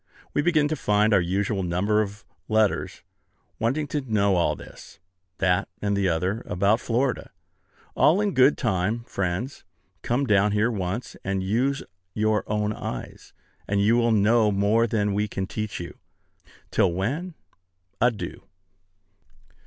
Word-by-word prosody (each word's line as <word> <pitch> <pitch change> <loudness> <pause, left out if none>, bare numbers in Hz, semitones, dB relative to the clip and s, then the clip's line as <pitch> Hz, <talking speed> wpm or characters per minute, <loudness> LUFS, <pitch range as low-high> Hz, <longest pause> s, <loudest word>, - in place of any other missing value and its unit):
We - - +2
begin 155 -2 +3
to 155 - -1
find 105 -4 +2
our 100 - +5
usual 95 +3 -1
number 95 +5 +1
of 105 +1 -6 0.2
letters, 110 -2 0 0.6
wanting 135 +7 0
to 150 - -1
know 105 -6 +1
all 85 - +2
this, - - -13 0.4
that, 90 +3 +1
and 100 -1 0
the 100 -2 +1
other, 90 +7 -1
about 100 +5 +2
Florida. 125 +3 -1 0.6
All 170 +6 +4
in 205 -2 0
good 130 +3 +5
time, 110 0 0
friends. 100 +5 -3 0.4
Come 125 +4 0
down 105 -2 +3
here 110 +3 +2
once, 100 +2 -4
and 95 -1 -1
use 125 +8 0 0.3
your 110 0 +1
own 105 0 0
eyes, - - -7 0.4
and 100 0 +1
you 105 +3 +4
will 120 -1 +3
know 110 +1 +4
more 105 +4 +2
than 105 -3 0
we 105 +1 0
can 95 -1 -3
teach 110 +2 -4
you. 85 - -8 0.7
Till 95 - +3
when, 140 - -3 0.7
adieu. 120 -3 0
105 Hz, 145 wpm, -25 LUFS, 100-120 Hz, 0.7 s, our